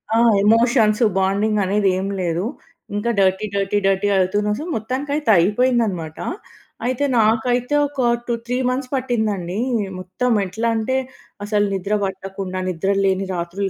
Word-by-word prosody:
ఆ! - - +4 0.3
ఎమోషన్స్, 230 0 +4 0.2
బాండింగనేది 200 0 +1
ఏమి 195 +1 -3
లేదు. 170 +2 -1 0.5
ఇంకా 205 +3 -1
డర్టీ, 190 +2 +2
డర్టీ, 200 +1 0
డర్టీ 195 +1 +1
అవుతునే 205 +3 +1
సొ, - - -4
మొత్తానికైతే, 275 +6 -2
అయిపోయిందనమాట. 205 -5 +1 0.7
అయితే, 255 +3 0
నాకైతే 245 +5 +2
ఒక 275 -2 -4 0.3
టూ 240 - 0
3 250 +1 -1
మంత్స్ 255 0 -3
పట్టిందండి. 220 -7 -1 0.4
మొత్తం 185 +7 -2
ఎట్లా 220 +5 -2
అంటే, 260 +4 0 0.5
అసలు 205 0 +1
నిద్ర 195 +3 -1
పట్టకుండా, 190 -1 -5
నిద్రలేని 195 +2 0
రాత్రులు 175 +3 -3
205 Hz, 125 wpm, -20 LUFS, 190-235 Hz, 0.7 s, ఆ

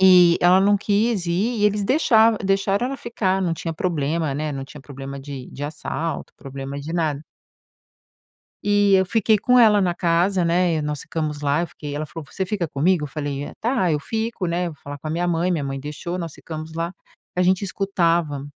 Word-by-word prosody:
Eh, 180 -2 +7
ela 180 +2 +6
não 205 +1 +4
quis 205 -1 +1
ir, 205 +7 0
e - - +3
eles 210 -1 +2
deixava 225 -5 +4
deixavam 195 +3 +1
ela 275 +1 -4
ficar, 195 -6 -1
não 180 -3 0
tinha 165 0 -4
problemas, 155 -3 -1
né, 155 0 -2
não 135 -1 -5
tinha 145 +2 -12
problema 135 0 -8
de 135 -2 -8
de 145 - -9
assalto, 155 +1 -4
problema 135 +1 -7
de 150 +3 -6
nada. 155 -4 -1 1.4
E 205 -1 +3
eu 190 0 +3
fiquei 220 +2 +3
com 250 +4 +4
ela 210 -3 +6
na 180 -2 +1
casa, 175 +2 +2
né, 170 0 +2
e 155 - -1
nós 150 -1 -3
ficamos 150 -2 -3
lá, 145 +3 +1
eu 175 - -2
fiquei, 145 -3 -7
ela 155 +1 -3
falou: 150 +2 -9
"Você 190 - -3
fica 185 -3 -2
comigo?" 155 +4 +1
Eu - - -3
falei: 145 -1 -4
"Eh, - - -9
tá, 225 -7 +1
eu 150 - +1
fico, 225 +3 -3
né, 175 +1 0
eu 170 - -5
vou 145 - -22
falar 145 0 -7
com 155 - -8
a - - -2
minha 175 +2 0
mãe." 175 +1 +1
Minha 160 -5 0
mãe 135 0 -3
deixou, 150 +5 -5
nós 165 -4 -5
ficamos 160 0 -8
lá. 170 +2 -3 0.4
A 180 - +2
gente 185 +2 +2
escutava 170 -7 0
170 Hz, 215 wpm, -22 LUFS, 150-195 Hz, 1.4 s, Eh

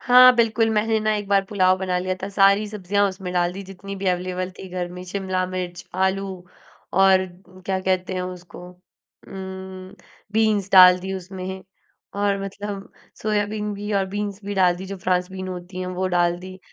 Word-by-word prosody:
हाँ, 250 0 +8
बिल्कुल, 225 -1 +3
मैंने 220 +1 +2
ना 215 0 +1
एक 205 -1 -4
बार 200 -1 +3
पुलाव 185 -2 +3
बना 185 -1 -1
लिया 185 +1 -1
था। 195 - -3
सारी 200 +1 +4
सब्ज़ियाँ 205 0 0
उसमें 190 -1 -6
डाल 175 -1 +1
दी, 195 +2 -7
जितनी 195 +1 -8
भी 195 0 -4
अवेलेबल 185 0 -2
थी 190 - -8
घर 180 -1 -3
में। 180 0 -8
शिमला 185 0 -2
मिर्च, 180 -1 -5
आलू, 190 +1 +1 0.6
और 190 0 +5 0.4
क्या 190 -1 0
कहते 185 0 0
हैं 185 - -2
उसको 180 -1 -8
उम, 190 +1 -11 0.4
बीन्स 215 -3 +2
डाल 185 -1 +9
दी 190 +1 -4
उसमें 190 0 -6 0.6
और 200 -1 +1
मतलब 200 0 -6 0.3
सोयाबीन 210 0 -1
भी 205 +1 -5
और 195 -1 +2
बीन्स 205 -1 -3
भी 205 0 -3
डाल 180 -2 +3
दी, 190 +2 -7
जो 195 - -6
फ्रांस 180 0 0
बीन 185 0 -6
होती 180 0 -7
हैं, 185 - -3
वो 185 +1 -2
डाल 175 0 +2
दी। 185 +1 -10
190 Hz, 185 wpm, -23 LUFS, 185-200 Hz, 0.6 s, डाल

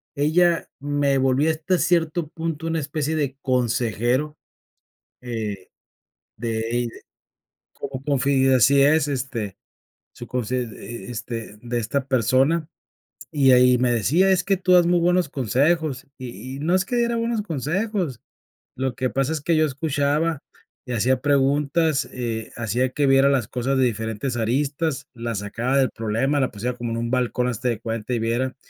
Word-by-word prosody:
ella 165 +4 +2
me 145 -1 +1
volví 135 +3 +2
hasta 160 +3 +1
cierto 165 -2 +1
punto 165 0 -4
una 165 0 0
especie 150 +2 -2
de 140 -3 -2
consejero, 125 +3 0 0.8
eh, 110 -6 -5 0.7
de 115 -1 -2
ella, 120 -1 -1 0.8
como 135 -1 -7
confi 140 -1 +2
eh, 130 - +5
así 135 +3 +5
es, 150 +1 +4
este, 125 -7 -3 0.6
su 120 - -9
confi 125 -1 -3
e 115 -2 -6
este 115 -2 -6
de 120 0 -2
esta 135 +4 -2
persona, 135 +6 +2 0.6
y 140 -3 +4
ahí 125 0 +6
me 125 -1 +2
decía: 155 - +3
"Es 185 -1 +3
que 195 -1 +2
tú 185 0 +1
das 175 -1 +6
muy 175 0 +4
buenos 180 +1 +2
consejos". 140 +3 0
Y 130 +1 -7
y - - -7
no 170 +4 +1
es 185 - +1
que 245 - -2
diera 235 0 +1
buenos 230 -1 -1
consejos, 170 - -2 0.6
lo 130 -1 -2
que 130 0 -1
pasa 135 +3 0
es 155 - -3
que 165 +2 +1
yo 155 - +4
escuchaba 145 +2 0 0.5
y 125 - -7
hacía 125 +3 +1
preguntas, 145 +2 +2
eh, 115 -3 -4
hacía 120 +3 0
que 145 +3 0
viera 135 +1 +5
las 130 -6 +1
cosas 130 +2 -1
de 130 - +3
diferentes 115 +1 -2
aristas, 140 +5 -1
las 115 -3 -4
sacaba 120 +6 -1
del 135 -2 +3
problema, 115 +6 0
la 130 - 0
pusiera 120 +4 -3
como 120 -1 -4
en 115 - -2
un 115 0 -2
balcón 125 -1 0
haste 125 0 -2
de 115 -2 -2
cuenta 115 +1 -4
y 120 - 0
viera. 120 +3 -1
135 Hz, 165 wpm, -23 LUFS, 120-155 Hz, 0.8 s, ahí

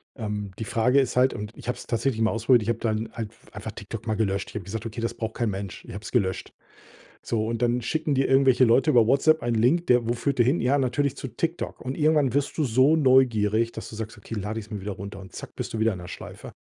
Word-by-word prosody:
Ähm, 105 -4 -4
die 110 - -3
Frage 125 +6 +3
ist 130 - 0
halt 130 +1 +4
und 105 +2 -6
ich - - -12
habe 125 - -1
es - - -11
tatsächlich 115 0 0
mal 110 - +3
ausprobiert. 115 +2 +3
Ich 115 - -3
habe 115 -1 0
dann 110 0 -1
halt 110 -2 -5 0.2
einfach - - -6
TikTok - - -8
mal 110 - 0
gelöscht. 100 -2 -1
Ich - - -15
habe 100 - -4
gesagt: 110 +3 -5
„Okay, 115 +1 -5
das 115 - -1
braucht 110 -1 -4
kein 120 -3 0
Mensch.“ 95 -1 -6
Ich - - -8
habe 100 +2 -7
es - - -7
gelöscht. 95 -7 -1 0.7
So 110 -2 -1
und 115 +1 -3
dann 120 0 +2
schicken 155 +4 -1
dir 135 0 +2
irgendwelche 135 -1 +5
Leute 130 +6 +4
über 115 -4 +5
WhatsApp 155 +5 +3
einen 115 -2 +1
Link, 170 +8 +2
der 125 -2 +3
wo - - +2
führt 130 +3 -2
der 120 - +6
hin? 135 +7 +2
Ja, 130 +4 +3
natürlich 140 +1 0
zu - - -5
TikTok. 165 +9 -3
Und 130 +2 -4
irgendwann 150 -5 +3
wirst 140 0 -1
du 155 - +2
so 130 +4 +4
neugierig, 115 -6 +3
dass 110 - -7
du - - -9
sagst: 110 0 -6
„Okay, 105 - -9
lade 105 +2 -3
ich 105 - -8
es - - -22
mir 105 -2 -4
wieder 100 0 -4
runter." 100 +1 -8
Und 95 -2 -12
zack, - - -9
bist - - -5
du 110 - -2
wieder 110 -1 +2
in 90 - -7
der 90 - -9
Schleife. - - -9
115 Hz, 275 wpm, -25 LUFS, 110-130 Hz, 0.7 s, der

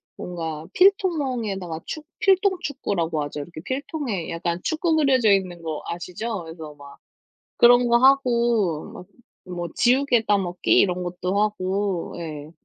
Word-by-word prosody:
뭔가 160 -3 -6
필통 375 -2 +4
멍에다가 200 - -3
축 310 -1 -6
필통 385 0 +3
축구라고 175 - -2
하죠. 145 0 -5
이렇게 155 +2 -9
필통에 260 - -3
약간 170 +1 -3
축구 320 0 0
그려져 265 -7 +3
있는 185 -3 -1
거 160 -2 -4
아시죠? 180 +4 -5
그래서 160 -2 -9
막 140 -1 -14 0.6
그런 245 +1 +6
거 235 0 +5
하고 235 - +2
막 180 - -10 0.4
뭐 175 -1 -5
지우개 250 -2 +3
따먹기 190 -4 +1
이런 180 -2 +2
것도 180 +2 -2
하고 195 -3 -1
예 155 -2 -7
195 Hz, 285 characters per minute, -23 LUFS, 170-255 Hz, 0.6 s, 그런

